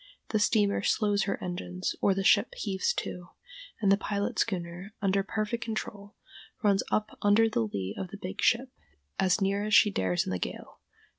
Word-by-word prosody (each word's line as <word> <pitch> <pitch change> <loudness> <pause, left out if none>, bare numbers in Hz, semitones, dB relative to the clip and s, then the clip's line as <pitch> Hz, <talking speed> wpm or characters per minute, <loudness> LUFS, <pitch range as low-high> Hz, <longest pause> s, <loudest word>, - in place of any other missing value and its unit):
The 215 - +1
steamer 205 -1 +2
slows 205 0 +1
her 195 - -1
engines, 180 0 -3
or 195 - +3
the 195 - -1
ship 200 +3 +4
heaves 195 -3 -1
to, 175 -1 -5 0.5
and 200 -3 +3
the 195 - +5
pilot 200 -1 -2
schooner, 180 0 -3
under 195 -1 +2
perfect 215 +4 -2
control, 210 -2 -5 0.5
runs 200 -2 +4
up 215 0 -1
under 205 +2 +5
the 215 - 0
lee 100 -1 -4
of 190 - -4
the 200 - -9
big 190 +2 -5
ship, 250 +2 +2 0.5
as 185 +2 +2
near 200 +1 +1
as 215 0 +2
she 205 +2 +6
dares 90 - 0
in - - -3
the 90 - -2
gale. - - -6
200 Hz, 180 wpm, -29 LUFS, 185-215 Hz, 0.5 s, she